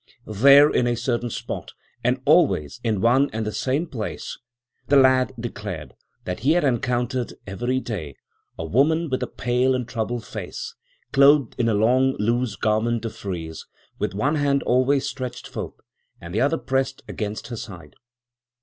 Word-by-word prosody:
There 140 Hz, +7 st, +7 dB
in 125 Hz, -4 st, +1 dB
a 120 Hz, -, +1 dB
certain 120 Hz, 0 st, -1 dB
spot -, -, -6 dB, 0.3 s
and 125 Hz, +2 st, +1 dB
always 120 Hz, -, +3 dB
in 110 Hz, -5 st, 0 dB
one 130 Hz, +5 st, +4 dB
and 110 Hz, 0 st, -2 dB
the 105 Hz, -, -2 dB
same 135 Hz, +9 st, -1 dB
place, 120 Hz, -10 st, -6 dB, 0.5 s
the 145 Hz, -, +3 dB
lad 130 Hz, -1 st, +5 dB
declared 105 Hz, -8 st, -6 dB, 0.3 s
that 90 Hz, -, -3 dB
he 140 Hz, +7 st, +3 dB
had 175 Hz, -, +2 dB
encountered, 125 Hz, -1 st, -1 dB
every 120 Hz, +6 st, -1 dB
day, 85 Hz, -, -5 dB, 0.4 s
a 80 Hz, -, -4 dB
woman 150 Hz, -, +2 dB
with 130 Hz, -, 0 dB
a -, -, -1 dB
pale 125 Hz, +2 st, +1 dB
and 125 Hz, -2 st, -3 dB
troubled 115 Hz, +1 st, -3 dB
face, 470 Hz, -2 st, -6 dB, 0.4 s
clothed 140 Hz, -2 st, +5 dB
in 115 Hz, -1 st, +2 dB
a 110 Hz, -, +2 dB
long 130 Hz, +5 st, +3 dB
loose 120 Hz, +1 st, 0 dB
garment 110 Hz, +2 st, 0 dB
of 115 Hz, -, -5 dB
frieze, 85 Hz, -5 st, -6 dB, 0.3 s
with -, -, -2 dB
one 140 Hz, +9 st, +1 dB
hand 140 Hz, -1 st, +1 dB
always 130 Hz, +3 st, +2 dB
stretched 130 Hz, -2 st, -6 dB
forth, -, -, -6 dB, 0.4 s
and 85 Hz, +1 st, -9 dB
the 105 Hz, -, +1 dB
other 145 Hz, +5 st, +2 dB
pressed 135 Hz, -1 st, -2 dB
against 105 Hz, +1 st, -5 dB
her 120 Hz, -, -4 dB
side. 100 Hz, -6 st, -9 dB
120 Hz, 165 wpm, -23 LUFS, 110-135 Hz, 0.5 s, There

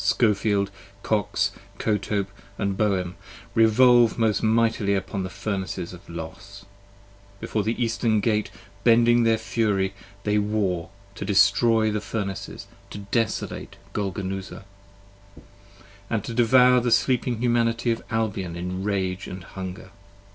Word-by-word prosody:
Scofield, 100 Hz, -3 st, +2 dB, 0.3 s
Kox, 100 Hz, -2 st, 0 dB, 0.3 s
Kotope 100 Hz, -2 st, -1 dB, 0.3 s
and 100 Hz, -2 st, -1 dB
Bowen, 95 Hz, -4 st, 0 dB, 0.4 s
revolve 120 Hz, +1 st, +5 dB
most 110 Hz, -3 st, +2 dB
mightily 110 Hz, -2 st, +2 dB
upon 95 Hz, 0 st, -3 dB
The 95 Hz, -, -4 dB
Furnace 95 Hz, +1 st, -4 dB, 0.2 s
of 90 Hz, +1 st, -13 dB
Los: 95 Hz, +4 st, -9 dB, 0.7 s
before 110 Hz, -, -2 dB
the 110 Hz, +4 st, -2 dB
eastern 115 Hz, -2 st, +1 dB
gate 105 Hz, 0 st, 0 dB, 0.3 s
bending 120 Hz, 0 st, +5 dB
their 115 Hz, -1 st, +4 dB
fury 100 Hz, -4 st, 0 dB, 0.3 s
They 105 Hz, 0 st, +2 dB
war, 100 Hz, -5 st, -1 dB, 0.2 s
to -, -, -6 dB
destroy 110 Hz, +3 st, +4 dB
the 105 Hz, 0 st, -2 dB
Furnaces, 100 Hz, -2 st, -5 dB, 0.2 s
to -, -, -8 dB
desolate 100 Hz, +2 st, -2 dB, 0.2 s
Golgonooza: 95 Hz, -2 st, -4 dB, 0.7 s
30 -, -, -16 dB, 0.7 s
And 110 Hz, -4 st, -1 dB
to 115 Hz, -, -5 dB
devour 125 Hz, +1 st, +5 dB
the 120 Hz, 0 st, 0 dB
Sleeping 120 Hz, +1 st, +2 dB
Humanity 115 Hz, -1 st, +1 dB
of 115 Hz, -, -2 dB
Albion 105 Hz, -6 st, -2 dB
in 90 Hz, +2 st, -4 dB
rage 95 Hz, -2 st, -2 dB
& -, -, -13 dB
hunger. 95 Hz, 0 st, -7 dB
105 Hz, 125 wpm, -24 LUFS, 95-115 Hz, 0.7 s, revolve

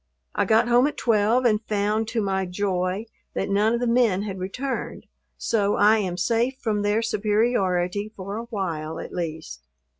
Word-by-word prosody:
I -, -, +1 dB
got 225 Hz, +2 st, +3 dB
home 245 Hz, +3 st, +5 dB
at 300 Hz, -, -5 dB
twelve 230 Hz, +2 st, +2 dB
and 215 Hz, -2 st, +3 dB
found, 210 Hz, +1 st, 0 dB
to 225 Hz, -1 st, -1 dB
my 190 Hz, -1 st, -1 dB
joy, 185 Hz, +1 st, -1 dB, 0.3 s
that -, -, -2 dB
none 210 Hz, +3 st, +3 dB
of -, -, -1 dB
the 245 Hz, -, -1 dB
men 230 Hz, -5 st, +2 dB
had 195 Hz, -3 st, -5 dB
returned, 250 Hz, +9 st, -4 dB, 0.3 s
so 205 Hz, -3 st, +1 dB
I 215 Hz, +2 st, +5 dB
am 180 Hz, -4 st, -2 dB
safe 235 Hz, +7 st, +1 dB
from 215 Hz, -3 st, -1 dB
their 205 Hz, +2 st, +1 dB
superiority 205 Hz, -3 st, 0 dB
for 195 Hz, +1 st, -6 dB
a 230 Hz, -, -5 dB
while, 165 Hz, -8 st, -4 dB
at -, -, -8 dB
least. 160 Hz, -, -5 dB
210 Hz, 175 wpm, -24 LUFS, 190-230 Hz, 0.3 s, home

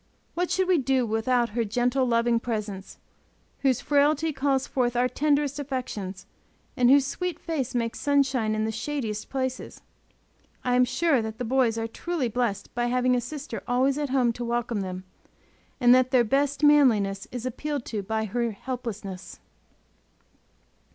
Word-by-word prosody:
What 355 Hz, +1 st, -1 dB
should 375 Hz, 0 st, +1 dB
we 365 Hz, -3 st, +4 dB
do 265 Hz, -1 st, +1 dB
without 235 Hz, +2 st, +1 dB
her 235 Hz, +2 st, -1 dB
gentle, 245 Hz, +4 st, +1 dB
loving 235 Hz, 0 st, +2 dB
presence, 210 Hz, -5 st, -5 dB, 0.6 s
whose 265 Hz, -3 st, +1 dB
frailty 300 Hz, +2 st, +2 dB
calls 270 Hz, -1 st, 0 dB
forth 245 Hz, -2 st, -1 dB
our 245 Hz, +1 st, +3 dB
tenderest 290 Hz, 0 st, 0 dB
affections 230 Hz, -9 st, -5 dB, 0.5 s
and 250 Hz, -3 st, +4 dB
whose 275 Hz, 0 st, +6 dB
sweet 360 Hz, +3 st, -3 dB
face 275 Hz, -7 st, -3 dB
makes 230 Hz, -1 st, -1 dB
sunshine 265 Hz, -6 st, +1 dB
in 215 Hz, 0 st, 0 dB
the 220 Hz, -, -1 dB
shadiest 225 Hz, -3 st, -4 dB
places! 260 Hz, -1 st, -4 dB, 0.8 s
I 250 Hz, -, 0 dB
am 250 Hz, 0 st, +5 dB
sure 295 Hz, 0 st, +2 dB
that 220 Hz, 0 st, -5 dB
the 245 Hz, -, -3 dB
boys 245 Hz, -2 st, +2 dB
are 225 Hz, -, -1 dB
truly 290 Hz, +2 st, -3 dB
blessed 220 Hz, -4 st, -2 dB
by 240 Hz, 0 st, 0 dB
having 250 Hz, +1 st, +2 dB
a 245 Hz, -, +1 dB
sister 270 Hz, -1 st, -6 dB
always 265 Hz, +3 st, +2 dB
at 290 Hz, -2 st, -2 dB
home 250 Hz, -3 st, +2 dB
to 240 Hz, -, -6 dB
welcome 235 Hz, -2 st, -1 dB
them, 185 Hz, -1 st, -5 dB, 0.8 s
and 245 Hz, -2 st, +6 dB
that 255 Hz, 0 st, +4 dB
their 255 Hz, -2 st, +4 dB
best 280 Hz, +4 st, 0 dB
manliness 225 Hz, -10 st, +4 dB
is 245 Hz, -1 st, -5 dB
appealed 285 Hz, +2 st, -3 dB
to 215 Hz, -3 st, -3 dB
by 220 Hz, +2 st, -2 dB
her 235 Hz, +3 st, -1 dB
helplessness. 210 Hz, -5 st, -6 dB
250 Hz, 160 wpm, -26 LUFS, 225-275 Hz, 0.8 s, whose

